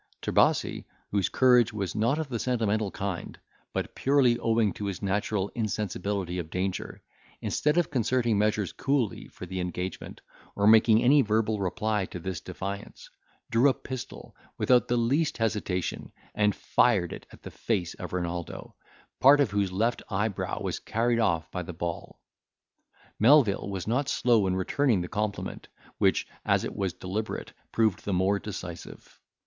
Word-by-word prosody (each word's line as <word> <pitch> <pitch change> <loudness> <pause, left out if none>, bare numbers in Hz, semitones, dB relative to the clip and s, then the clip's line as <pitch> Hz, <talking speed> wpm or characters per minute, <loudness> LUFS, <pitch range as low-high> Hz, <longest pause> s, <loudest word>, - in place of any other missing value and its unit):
Trebasi, - - +2 0.3
whose 100 -2 +1
courage 125 -3 +4
was 100 -5 -3
not 115 +7 +1
of 160 -2 -2
the 120 -4 -3
sentimental 110 -4 0
kind, 95 -2 -5 0.3
but - - -3
purely 130 -4 +3
owing 115 -3 +2
to 105 - -5
his 100 0 -5
natural 100 0 0
insensibility 100 -4 -2
of 80 -2 -5
danger, 95 +2 -3 0.4
instead 150 +3 0
of 175 -3 +2
concerting 120 -2 +1
measures 105 -1 +1
coolly 135 -6 -1
for - - -10
the 95 +1 -5
engagement, 90 +1 -5 0.3
or 100 - +1
making 110 +1 +6
any 140 +4 +6
verbal 110 -1 +1
reply 105 +2 -1
to - - -7
this 90 -1 -4
defiance, 100 +1 -7 0.4
drew 120 +5 +5
a 130 - +1
pistol, 130 -2 -8 0.2
without 125 -1 +3
the 120 - +1
least 140 +7 +1
hesitation, 105 -5 -2 0.2
and 105 -1 +2
fired - - +2
it - - -10
at - - -16
the - - -8
face 95 -7 -2
of - - -8
Renaldo, 85 -2 -4 0.5
part 140 +2 +7
of 135 -8 +2
whose 100 -2 0
left 115 +5 0
eyebrow 105 0 -2
was - - -2
carried 115 +1 0
off 85 -7 +1
by 90 - -3
the 90 0 -7
ball. 85 0 -5 1.0
Melvil 115 -5 +5
was 95 -3 -4
not 125 +5 0
slow 115 -5 +3
in 95 - 0
returning 110 +3 +1
the 90 - -4
compliment, 105 0 -3 0.3
which, - - +2 0.2
as - - +2
it - - -5
was 95 -2 -1
deliberate, 100 +6 -5 0.2
proved 110 -4 +1
the 100 - -2
more 95 +2 +2
decisive. 90 -5 -9
105 Hz, 155 wpm, -28 LUFS, 95-120 Hz, 1.0 s, part